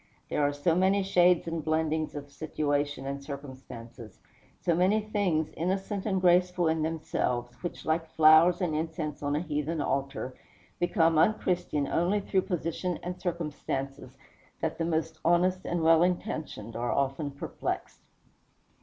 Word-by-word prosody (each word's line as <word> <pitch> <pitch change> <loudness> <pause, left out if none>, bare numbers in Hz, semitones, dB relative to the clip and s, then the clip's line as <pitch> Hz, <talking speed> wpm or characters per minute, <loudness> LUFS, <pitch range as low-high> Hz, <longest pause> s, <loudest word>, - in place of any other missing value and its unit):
There - - 0
are 145 0 +3
so 145 +4 +1
many 190 +2 +3
shades 180 -3 +4
and 165 -1 -3
blendings 155 0 0
of 145 -1 -7
situation 145 -2 -2
and 140 0 -4
circumstances, 130 -5 -9 0.4
so 170 - +1
many 185 +6 +3
things, 200 -7 0
innocent 190 +4 -2
and 190 -2 +1
graceful 180 -1 +3
in 160 0 +1
themselves, 140 -6 -1
which, 175 - -6
like 160 0 0
flowers 160 +4 +6
and 175 -4 0
incense 160 -1 -3
on 145 0 0
a 150 - 0
heathen 155 0 -2
altar, 135 -2 -2 0.5
become 165 -2 +3
unchristian 175 -7 +1
only 180 +5 +1
through 195 -1 +1
position 175 0 -2
and 180 0 -5
circumstances, 145 -6 -4 0.4
that 160 0 -2
the 165 - +1
most 160 -1 -1
honest 180 +2 +2
and 175 -1 -1
well 165 0 +6
intentioned 160 - -2
are 120 +1 -1
often 140 +2 0
perplexed. 140 0 -5
160 Hz, 145 wpm, -29 LUFS, 145-180 Hz, 0.5 s, flowers